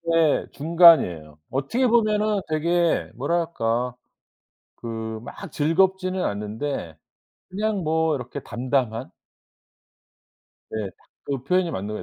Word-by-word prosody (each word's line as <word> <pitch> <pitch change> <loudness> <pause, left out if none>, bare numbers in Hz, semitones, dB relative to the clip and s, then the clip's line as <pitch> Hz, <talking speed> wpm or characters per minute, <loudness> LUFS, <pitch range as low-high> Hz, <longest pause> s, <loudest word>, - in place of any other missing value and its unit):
예 160 -3 +3
중간이에요. 145 - +4
어떻게 140 - 0
보면은 215 -3 +2
되게 170 +2 +1
뭐랄까? 125 -5 -1 0.8
그 110 -1 -5
막 - - -9
즐겁지는 185 +4 +1
않은데 105 - -4 0.5
그냥 205 -2 -1
뭐 160 -1 +1
이렇게 125 +2 -6
담담한? 125 -1 -2 1.6
네. 105 -3 -3
딱 - - -30 0.2
그 135 -3 -2
표현이 180 +4 +1
맞는 100 +2 -4
거 105 - -4
145 Hz, 220 characters per minute, -24 LUFS, 115-175 Hz, 1.6 s, 중간이에요